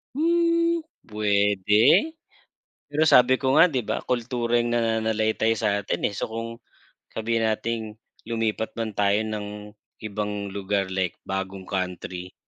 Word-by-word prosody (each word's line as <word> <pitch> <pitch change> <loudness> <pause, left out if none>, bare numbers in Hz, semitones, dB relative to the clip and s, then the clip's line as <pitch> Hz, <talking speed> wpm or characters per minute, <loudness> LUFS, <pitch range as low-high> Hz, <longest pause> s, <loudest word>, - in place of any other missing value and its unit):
Hmm 335 +1 +2 0.2
pwede, 105 - +3 0.8
pero 150 +2 +1
sabi 130 -3 +6
ko 130 0 0
nga - - +8
di 130 -7 -2
ba - - -2
kultura 120 -1 -1
yung 120 0 +1
nananalaytay 110 -1 +1
sa'tin 100 -2 0
eh. 100 - -6
So, - - -4
kung 115 +1 -4 0.7
sabihin 115 0 0
nating 115 +1 -1 0.4
lumipat 115 -1 -2
man 115 -1 -3
tayo 100 +1 +1
ng 105 -1 -6 0.3
ibang 105 -1 -4
lugar 100 -1 -2
like 95 -2 -1
bagong 95 0 -4
country, 90 -1 -5
110 Hz, 125 wpm, -25 LUFS, 100-120 Hz, 0.8 s, nga